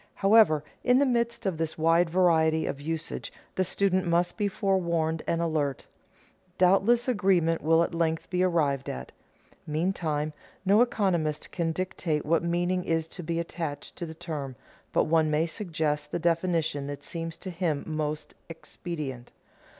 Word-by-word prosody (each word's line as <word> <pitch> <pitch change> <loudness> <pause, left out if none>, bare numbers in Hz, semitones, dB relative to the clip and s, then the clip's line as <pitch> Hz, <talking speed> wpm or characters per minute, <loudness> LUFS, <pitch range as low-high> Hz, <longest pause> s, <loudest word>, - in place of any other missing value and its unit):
However, 195 -7 +5 0.2
in 250 0 +4
the 280 - +4
midst 235 -3 0
of 180 -5 -1
this 160 -1 -2
wide 165 +2 +3
variety 160 -3 +3
of 140 - -4
usage 160 +2 -4 0.2
the 190 - +1
student 185 -1 +1
must 175 +1 +2
be 205 -2 0
forewarned 170 -5 0
and 170 0 +1
alert. 150 -5 -1 0.7
Doubtless 195 +7 +4
agreement 185 -8 +2
will 165 +2 +4
at 170 - -3
length 165 -1 0
be 180 0 +1
arrived 150 -7 +1
at. 65 0 -6 0.6
Meantime, 155 -2 -1 0.3
no 200 +4 +5
economist 180 -10 0
can 165 -2 -1
dictate 165 -3 -2
what 165 +2 +2
meaning 175 +2 0
is 165 -1 0
to 180 - -7
be 165 0 -2
attached 165 -4 -5
to 170 - -4
the 160 - -8
term, 150 -6 -5 0.4
but - - +3
one 160 -1 +2
may 155 +2 +2
suggest 155 -4 -2
the - - -1
definition 165 -4 0
that 145 0 -6
seems 165 -1 -5
to 190 - -7
him 165 -4 -1
most 155 -1 -3 0.2
expedient. 150 -6 -7
165 Hz, 155 wpm, -28 LUFS, 155-185 Hz, 0.7 s, However